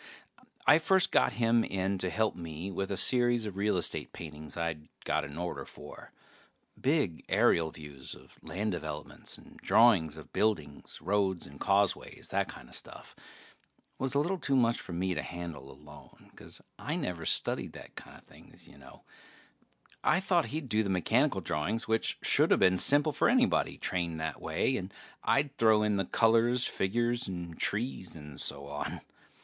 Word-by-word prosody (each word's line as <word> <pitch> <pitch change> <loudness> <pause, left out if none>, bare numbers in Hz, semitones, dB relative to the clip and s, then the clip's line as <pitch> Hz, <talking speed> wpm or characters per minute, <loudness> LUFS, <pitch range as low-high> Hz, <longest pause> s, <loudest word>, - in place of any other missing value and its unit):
I 150 - +7
first 190 +3 +3
got - - +3
him 115 -1 +3
in 95 0 -1
to 90 - -1
help 110 +5 0
me 85 +2 -6
with 95 +1 -3
a 100 - -2
series 120 -1 +3
of 105 -3 -5
real 100 0 +1
estate 85 - -2
paintings 75 -1 -7
I'd 80 -2 -3 0.2
got 80 0 +1
an 75 0 -8
order 90 0 -3
for. - - -11 0.7
Big 135 - +1
aerial 80 -1 +3
views 75 -4 -8
of - - -18
land 105 +3 -3
developments, 75 -4 -6
and - - -16
drawings 100 -9 +4
of 80 - -12
buildings, 80 -10 -1
roads 95 -1 0
and 70 +1 -13
causeways, 100 -1 +1
that - - 0
kinda - - -13
stuff. - - -7 0.8
Was 135 0 0
a - - +4
little 180 +5 0
too 140 -3 +1
much 120 -2 +3
for - - -10
me 90 +2 -1
to 75 - -2
handle 85 -6 -7
alone, 75 +1 -16
'cause - - -9 0.2
I - - -3
never 85 -3 -3
studied - - 0
that - - -12
kinda - - -11
things, - - -12
ya - - -16
know. 65 -2 -15 1.0
I 155 - +4
thought 180 -4 +2
he'd 155 -2 -4
do 110 -2 +2
the 100 - -2
mechanical 90 -3 +2
drawings, 100 +10 -2
which 110 0 +1
shoulda - - +5
been 90 0 +4
simple 145 - +5
for - - +3
anybody 250 0 +2
trained 85 -3 -2
that 80 -1 -4
way, 130 - 0
and 95 +1 -5 0.3
I'd 140 0 +1
throw 110 -2 +5
in 105 -1 +1
the 95 - 0
colors, 115 +4 +3
figures 120 +5 0
and 85 -3 -6
trees 100 -4 -2
and 75 -3 -9
so 70 0 -4
on. 75 +1 -5
95 Hz, 170 wpm, -31 LUFS, 80-120 Hz, 1.0 s, I